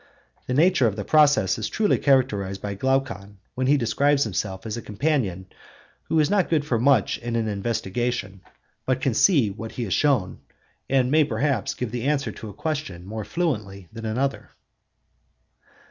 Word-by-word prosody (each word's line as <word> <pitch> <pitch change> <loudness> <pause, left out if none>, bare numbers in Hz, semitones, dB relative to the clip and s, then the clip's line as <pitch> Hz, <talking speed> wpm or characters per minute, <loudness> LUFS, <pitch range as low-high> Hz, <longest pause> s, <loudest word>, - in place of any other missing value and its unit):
The 125 - -1
nature 155 -4 +4
of 105 - -2
the 105 - -5
process 145 -11 +4
is 110 - -3
truly 215 -2 +1
characterized 105 -9 +1
by 100 -1 -4
Glaucon, 105 -4 -2 0.2
when 130 0 -1
he 145 +2 +4
describes 140 +4 +2
himself 95 -2 -3
as 110 0 -3
a 120 - -5
companion 105 - -1 0.6
who 160 - +2
is 150 - +4
not 200 -2 +1
good 155 -3 +1
for 120 -6 0
much 130 -3 +3
in 120 0 -4
an 115 -1 0
investigation, 105 -1 -2 0.5
but 130 -1 +1
can 130 -2 0
see 135 - +4
what 110 +3 -8
he 120 - -3
is 95 - -2
shown, 130 -11 +1 0.5
and 130 -1 +2
may, 155 +1 +5
perhaps, 130 -2 -1
give 125 -4 -4
the 120 0 -4
answer 145 -1 0
to 110 - -9
a - - -10
question 140 - -4
more 110 +2 -5
fluently 105 - -3
than 115 -1 -6
another. 135 +5 -2
120 Hz, 175 wpm, -24 LUFS, 105-140 Hz, 0.6 s, may